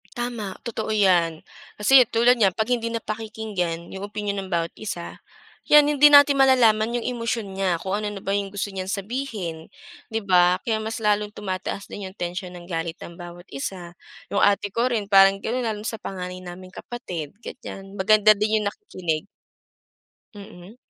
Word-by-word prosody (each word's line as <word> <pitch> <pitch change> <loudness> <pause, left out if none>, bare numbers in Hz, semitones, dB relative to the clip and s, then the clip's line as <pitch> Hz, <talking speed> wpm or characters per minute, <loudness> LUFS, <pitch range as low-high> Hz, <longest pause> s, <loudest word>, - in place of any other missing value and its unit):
Tama, 235 -5 -4
totoo 220 -1 -3
'yan. 180 -6 +3 0.4
Kasi 255 +5 +7
tulad 235 +2 +4
niyan 205 -6 +3
'pag 220 +4 -2
hindi 235 -2 -1
napakikinggan 215 -6 -4
yung 190 - -6
opinyon 205 -2 -3
ng 190 - -12
bawat 170 -1 -1
isa, 175 -5 -7 0.5
yan, 295 -1 +8
hindi 295 0 +6
natin 285 -1 +7
malalaman 235 -3 +4
yung 240 - -5
emosyon 230 -4 -3
niya 190 -3 0
kung 190 +3 -4
ano 205 -1 -4
na - - -8
ba 195 - 0
yung 200 -1 -1
gusto 200 0 -4
niyang 190 0 -4
sabihin, 200 -6 -4 0.4
di 225 - -2
ba? 180 -3 +4
Kaya 220 -2 0
mas 220 +1 -4
lalong 210 -2 +1
tumataas 200 -1 -5
din 200 -2 -7
yung 185 - -19
tensyon 180 +1 -5
ng 175 - -11
galit 165 -1 -4
ng 170 - -10
bawat 175 0 -11
isa. 175 +5 -6 0.4
Yung 200 - +2
ate 205 -1 +2
ko 240 +2 +1
rin 225 -4 -1
parang 195 -1 +6
gano'n 235 +5 -2
lalo 215 -3 -3
na - - -1
sa 225 -1 -5
panganay 180 -1 -6
naming 185 +1 -10
kapatid, 180 - -7
ganiyan. 195 -6 -9
Maganda 215 +2 +5
din 215 +1 +1
yung 210 - -2
nakikinig. 175 - -4 1.1
Mm. 195 0 -12
205 Hz, 175 wpm, -24 LUFS, 185-225 Hz, 1.1 s, yan